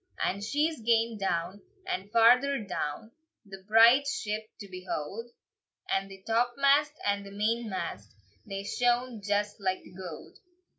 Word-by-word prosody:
And 200 +2 -1
she's 295 +5 0
gane 225 -1 +2
down, 190 +1 -2 0.2
and 195 +3 -4
farther 250 +5 +5
down, 190 +2 -4 0.3
The 195 -1 -11
bride's 230 +7 +6
ship 215 +1 -4
to 200 - -8
behold, 185 +3 -5 0.6
And 195 0 0
the 195 -1 -12
topmast 275 +6 +3
and 200 0 0
the 200 - -10
mainmast 205 - -2 0.3
They 195 - -5
shone 245 +1 0
just 205 +1 -1
like 185 -1 -1
the - - -15
gold. 180 -4 -9
210 Hz, 135 wpm, -29 LUFS, 195-235 Hz, 0.6 s, bride's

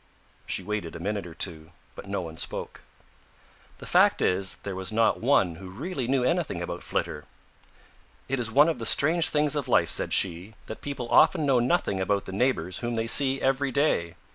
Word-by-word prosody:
She - - -3
waited 105 -6 -4
a - - -7
minute 100 +1 -3
or 80 - -11
two, 80 -1 -4 0.2
but - - -11
no 100 -1 -2
one 80 -2 -8
spoke. - - -4 1.0
The - - -11
fact - - +4
is 95 +1 0
there 100 -2 -5
was 95 +1 -3
not 110 0 +2
one 100 -10 +2
who 95 +1 -10
really 135 - -5
knew 130 -1 +1
anything 165 - 0
about 85 - -5
Flitter. - - -3 1.0
"It 135 0 -1
is 115 -2 -1
one 145 +6 +5
of 165 - -1
the - - -4
strange 160 +3 +4
things 150 -1 +1
of 145 -3 -2
life," - - +2
said - - -2
she, 95 +3 0
"that 110 - -8
people 140 -4 -5
often 160 -5 +5
know 135 -3 +3
nothing 110 -5 0
about 100 +1 0
the - - -7
neighbors 95 -5 -1
whom 120 -1 -3
they 115 0 -1
see 135 +3 +3
every 135 +1 +1
day. 105 - 0
115 Hz, 195 wpm, -26 LUFS, 95-135 Hz, 1.0 s, one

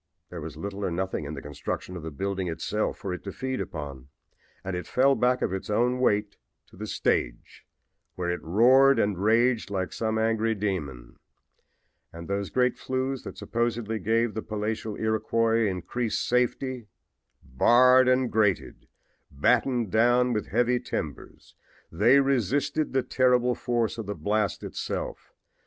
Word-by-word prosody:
There 85 -2 -6
was 75 -1 -8
little 100 +4 -5
or - - 0
nothing 90 -2 -3
in 75 +2 -5
the 70 - -8
construction 75 +5 -5
of 85 - -6
the 80 - -5
building 95 +5 -3
itself 105 +6 -2
for 95 - -4
it 90 - -7
to 100 - -5
feed 130 +3 -3
upon, 70 -5 -7 0.6
and 95 -1 -4
it 90 - -5
fell 135 +2 +3
back 125 -1 +1
of - - -1
its 95 - -5
own 120 +4 +1
weight 105 -4 +1 0.3
to - - -18
the 105 +3 -6
stage, - - -2 0.5
where 90 -1 -2
it 90 - -3
roared 130 +10 +5
and 100 -1 +1
raged 115 +5 +2
like 95 -2 -3
some 110 -1 -1
angry 110 0 +1
demon. 85 - -4 0.9
And 85 0 -9
those 100 0 -2
great 125 -1 +1
flues 130 0 -2
that - - -8
supposedly 115 -1 -2
gave 115 +1 +1
the 110 - -3
palatial 110 0 -3
Iroquois 110 +1 +1
increased 105 +5 -2
safety! 125 -1 0 0.6
Barred 125 - +5
and 130 -1 +2
grated, 105 -4 0 0.4
battened 120 - +1
down 120 +2 +3
with 105 - -2
heavy 120 +3 +1
timbers 80 - -6 0.4
they 115 +11 +5
resisted 140 +3 0
the 130 -1 +2
terrific 125 -1 +2
force 120 -2 -1
of 110 - -5
the 105 - -3
blast 105 +5 -1
itself. - - -5
110 Hz, 155 wpm, -26 LUFS, 95-125 Hz, 0.9 s, roared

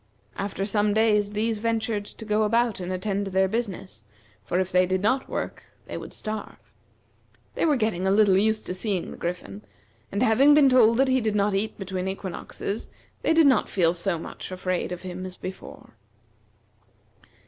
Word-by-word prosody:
After 195 0 -3
some 205 0 +1
days 210 -2 +2
these 220 +1 0
ventured 225 -2 -1
to 220 - -9
go 210 0 +1
about 230 0 +2
and 180 0 -4
attend 195 +2 -2
to - - -4
their 190 +1 +3
business, 195 - -4 0.4
for 175 - -1
if 190 0 -1
they 180 0 +4
did 185 +1 -1
not 260 +5 +1
work - - -4 0.2
they - - -7
would - - -7
starve. 215 0 -6 1.0
They - - 0
were 300 - +4
getting 215 -6 0
a - - +3
little 200 -1 +5
used 215 +2 +1
to - - -3
seeing 185 -1 -2
the - - -9
Griffin, 180 +4 -5 0.5
and 200 +5 0
having 270 +6 +5
been 290 -2 +6
told 230 -3 +5
that 270 +1 +4
he 260 0 +2
did 215 -2 -1
not 205 0 +2
eat 215 +3 -1
between 190 -1 -4
equinoxes, 195 +2 -5 0.3
they - - +1
did 325 -1 +5
not 270 -2 +4
feel 170 -3 +2
so 175 0 -1
much 165 - -8
afraid 185 0 -2
of 180 0 -6
him 185 0 -6
as 185 -1 -7
before. 185 0 -9
205 Hz, 185 wpm, -25 LUFS, 185-220 Hz, 1.0 s, been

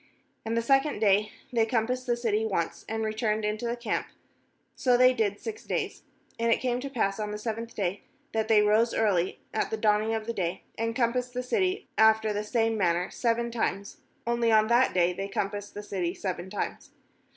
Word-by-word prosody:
14And 225 - -1
the 230 - +1
second 270 +4 +3
day 205 0 +3 0.2
they 230 -2 +4
compassed 245 +3 -1
the 240 -1 +1
city 220 -2 0
once, 190 -6 -2
and 220 0 -1
returned 215 0 0
into 215 +3 -2
the 235 - -1
camp; 235 -3 -2 0.7
so 250 -2 +3
they 255 +1 +6
did 205 -4 0
six 440 -1 -6
days. - - -3 0.4
15And 230 0 +2
it - - 0
came 245 -1 0
to 275 +2 -5
pass 220 -6 -1
on 210 -1 -2
the 210 - -4
seventh 230 +1 -5
day, 195 -1 -2 0.3
that 220 -1 0
they 215 -2 +5
rose 215 +3 +3
early 190 -5 +1 0.2
at - - 0
the 220 - -2
dawning 215 +1 +2
of 220 -1 -3
the 235 - -2
day, 180 -3 -2
and 230 0 -2
compassed 250 0 0
the 250 - -1
city 375 - 0
after 220 -1 +5
the 205 +1 -2
same 225 0 0
man 170 -3 +3
ner 180 +2 -2
seven 235 0 0
times; 200 -3 -2 0.3
only 235 -1 +2
on 215 -1 +5
that 240 +2 +4
day 180 0 +3
they 195 +2 -4
compassed 205 +1 -3
the 205 - -6
city 185 -3 -2
seven 185 -1 -4
times. 205 - -4
220 Hz, 205 wpm, -28 LUFS, 205-235 Hz, 0.7 s, they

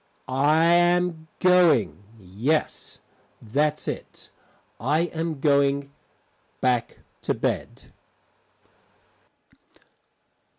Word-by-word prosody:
I 145 +5 +2
am 175 -1 +2
going 165 - +3
yes, 110 - -3 0.4
that's 150 +7 -1
it, - - -7 0.5
I 145 +8 +1
am 160 -2 -3
going 140 -1 +1 0.7
back 125 -2 0 0.2
to - - -1
bed. - - -4
150 Hz, 70 wpm, -24 LUFS, 130-165 Hz, 0.7 s, going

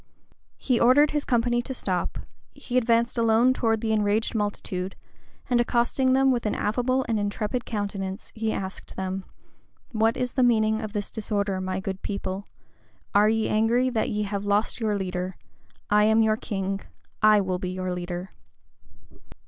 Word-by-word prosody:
He 250 -3 +1
ordered 280 +5 +5
his 295 -1 -1
company 240 0 +2
to 265 +2 -6
stop; 185 -6 -2 0.4
he 245 - -6
advanced 235 -1 +2
alone 230 +3 +4
towards 225 -3 0
the 220 - 0
enraged 210 +1 +1
multitude, 195 -3 -3 0.5
and 245 -2 +3
accosting 245 +2 +2
them 270 0 +4
with 240 -3 0
an - - -1
affable 250 +4 0
and 225 -2 0
intrepid 210 +4 -2
countenance, 200 -2 -4
he 220 0 -1
asked 190 -2 -6
them, 190 0 -3 0.7
"What 225 0 +2
is 250 -1 -1
the 260 - 0
meaning 220 -2 +3
of 215 -2 -6
this 205 -2 -3
disorder 200 -3 -1
my 185 0 -2
good 190 0 -5
people? 200 -1 -4 0.7
Are 210 +1 +5
ye 225 0 +1
angry 235 +4 +2
that 225 -3 0
ye 210 0 -1
have 200 -1 -3
lost 205 +3 +1
your 215 -3 0
leader? 185 -1 -3 0.5
I 210 0 +5
am 220 +1 +4
your 215 0 +3
king: 195 -3 -3 0.4
I 215 -1 +6
will 185 -2 -1
be 180 - -3
your 185 0 -3
leader." 180 +1 -5
215 Hz, 165 wpm, -25 LUFS, 195-235 Hz, 0.7 s, I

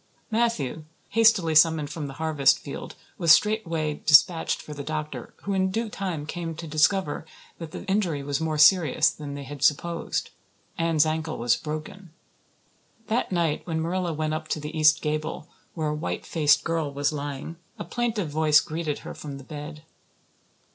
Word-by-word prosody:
Matthew, 215 - 0 0.2
hastily 220 -7 +4
summoned 155 -2 +4
from 150 -1 -5
the 135 - -9
harvest 155 -3 +3
field, - - -8 0.2
was 165 -2 +5
straightway 165 -6 +3
dispatched 160 +2 +5
for 150 - -9
the 145 - -6
doctor, 150 -4 -5
who 200 - -2
in 190 0 +1
due 225 +3 -2
time 180 -8 -4
came, 165 +1 -5
to 165 - -7
discover 155 +2 +1 0.4
that 165 -2 -6
the - - -8
injury 180 -7 0
was 140 +1 -2
more 160 -1 -1
serious 155 -1 +5
than 145 -2 -7
they 140 - -6
had 140 +1 -9
supposed. 170 +3 0 0.4
Anne's 165 -2 +2
ankle 160 0 -2
was 120 0 +2
broken. 155 +4 -7 1.0
That 225 -1 0
night, 170 -4 0
when 160 -2 -1
Marilla 175 +2 -1
went 155 0 -2
up 155 0 -4
to 155 - -2
the 150 +2 -7
east 155 0 +4
gable, 155 +1 -3 0.3
where 155 -3 -1
a - - -1
white 150 - -4
faced 150 -3 +3
girl 165 -3 -1
was 145 +2 -1
lying, 145 +2 -5 0.2
a - - -5
plaintive 215 -4 -2
voice 155 0 +5
greeted 155 -2 -3
her - - -6
from 145 -2 -8
the 135 - -11
bed. 150 +2 -8
155 Hz, 170 wpm, -25 LUFS, 150-170 Hz, 1.0 s, was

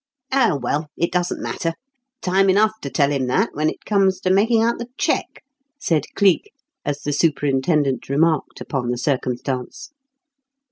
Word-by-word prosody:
"Oh, 240 - +3
well, 145 +4 -2
it 170 - 0
doesn't 180 0 -1
matter. 165 -1 -2 0.5
Time 190 +1 +3
enough 210 +3 +4
to 140 - -4
tell 140 +2 +2
him 135 -3 0
that 125 - +2
when 155 +2 +1
it - - -9
comes 195 -3 +2
to 185 - +1
making 220 +4 +3
out 235 +1 +1
the 235 - -5
cheque," - - -1 0.4
said 160 - +1
Cleek, 200 - +3 0.3
as 145 0 -3
the 145 - -2
superintendent 140 -3 +1
remarked 155 +2 +1
upon 125 -4 -3
the 125 - -1
circumstance. 130 - -3
155 Hz, 155 wpm, -21 LUFS, 140-195 Hz, 0.5 s, enough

